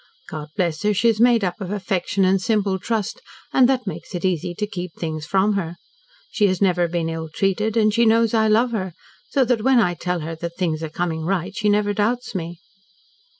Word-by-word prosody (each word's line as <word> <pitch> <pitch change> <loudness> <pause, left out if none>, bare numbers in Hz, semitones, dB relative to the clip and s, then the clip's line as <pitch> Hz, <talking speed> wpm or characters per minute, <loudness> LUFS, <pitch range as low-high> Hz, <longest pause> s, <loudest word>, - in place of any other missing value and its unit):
God 150 -1 -5
bless 170 -5 0
her, 210 0 +1
she 230 +5 +3
is 225 -1 +1
made 235 -3 +5
up 180 +1 -2
of 185 - -4
affection 195 -1 0
and 190 0 +3
simple 200 -3 +1
trust, 225 - -2 0.3
and 255 -1 +5
that 255 -2 +1
makes 195 -1 -6
it 175 - -3
easy 175 -1 -1
to 210 - -1
keep 180 -5 -6
things 155 -2 -4
from 195 +2 +2
her. 175 -4 -3 0.6
She 210 -3 +3
has 185 -2 0
never 180 -3 +2
been 170 -1 -2
ill 165 -1 -4
treated, 200 +6 0
and 215 -1 +3
she 235 0 +3
knows 230 0 +3
I 220 -1 +3
love 230 +3 +3
her, 190 -6 -3 0.4
so 270 -2 +2
when 245 +1 +3
I 180 -6 +2
tell 180 0 -3
her 160 +2 -4
that 170 +1 -6
things 165 -4 -1
are 160 - -4
coming 160 0 -2
right, 190 +2 -2
she 210 -1 +1
never 205 0 +2
doubts 235 +4 -1
me. 170 -2 -5
195 Hz, 215 wpm, -22 LUFS, 175-220 Hz, 0.6 s, made